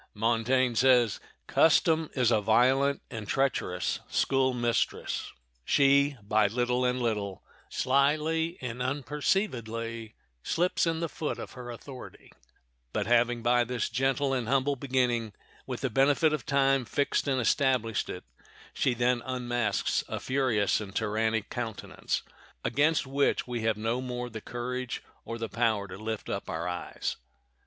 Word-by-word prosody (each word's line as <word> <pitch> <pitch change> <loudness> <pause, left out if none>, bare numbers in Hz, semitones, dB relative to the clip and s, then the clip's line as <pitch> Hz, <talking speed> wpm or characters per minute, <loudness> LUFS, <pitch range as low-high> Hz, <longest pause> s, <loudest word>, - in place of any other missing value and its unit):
Montaigne 120 +3 +2
says, 120 -3 +4 0.3
"Custom 160 0 +3
is 125 -3 +3
a 110 -2 +3
violent 130 +6 +3
and 110 -3 -6
treacherous 105 -9 0
school 135 -1 +2
mistress. 120 -2 -1 0.3
She, 140 - +4
by 105 0 +3
little 125 +3 0
and 125 0 +1
little, 105 -5 -2 0.3
slyly 155 +5 +1
and 125 -1 -5
unperceivedly 120 - -2 0.3
slips 175 - +1
in 165 0 0
the 170 - 0
foot 155 -1 -4
of - - -7
her 125 -1 -9
authority; 125 +2 -10 0.6
but 105 - 0
having 120 +1 +2
by 120 +1 +4
this 120 0 -2
gentle 135 +3 +1
and 125 -4 -1
humble 135 +2 +2
beginning, 125 -5 0 0.3
with 125 -2 -4
the 130 - 0
benefit 145 +5 +3
of 155 - -3
time, 135 -2 +3
fixed 140 +6 0
and 135 -2 +1
established 125 -2 +1
it, - - -6 0.5
she 125 - +1
then 120 0 +1
unmasks 120 -4 -1
a - - -4
furious 125 -7 +1
and 100 -2 -8
tyrannic 110 0 0
countenance, 115 -3 -3 0.4
against 145 +7 +2
which 140 +1 +1
we 120 -2 -3
have 110 -1 +1
no 115 +3 -1
more 125 -1 -4
the 110 0 -6
courage 125 +1 -4 0.2
or 115 - -5
the 115 -1 -3
power 110 -2 0
to 90 - -8
lift 110 0 -4
up - - -4
our 85 +2 -3
eyes." 90 0 -4
125 Hz, 145 wpm, -29 LUFS, 115-135 Hz, 0.6 s, says